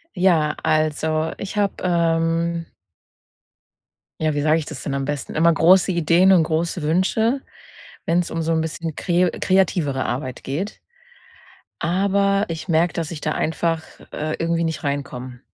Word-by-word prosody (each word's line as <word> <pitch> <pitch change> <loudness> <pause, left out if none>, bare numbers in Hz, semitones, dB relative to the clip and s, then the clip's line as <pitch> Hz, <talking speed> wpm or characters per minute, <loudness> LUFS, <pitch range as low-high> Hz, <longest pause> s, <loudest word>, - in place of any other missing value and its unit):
Ja, 165 -5 +3
also 155 0 +1
ich 200 +1 -6
habe, 200 -1 +1
ähm 165 -1 +1 1.6
ja, 155 -1 +1
wie 145 - -1
sage 155 +2 +3
ich 155 - -5
das 155 -5 -8
denn 140 - -3
am 135 0 -2
besten? 145 -1 -4
Immer 165 +2 +4
große 185 +3 +4
Ideen 175 +3 +4
und 175 -3 +5
große 165 +2 -1
Wünsche, 195 - +1 0.6
wenn 170 +2 +2
's 175 - -5
um 165 0 -3
so 165 - -1
'n 160 -1 +2
bisschen 160 0 -4
kre 175 0 +1
kreativere 170 -8 +1
Arbeit 130 +1 -4
geht. 165 +10 -4 1.0
Aber, 200 +3 +2
ich 165 +1 -5
merke, 170 0 +2
dass 165 -3 -3
ich 160 -3 -7
da 155 - -1
einfach, 165 +1 -1 0.3
äh, 155 +1 -3
irgendwie 170 0 0
nicht 160 -3 -3
reinkomme. 130 -3 -4
165 Hz, 155 wpm, -21 LUFS, 155-175 Hz, 1.6 s, und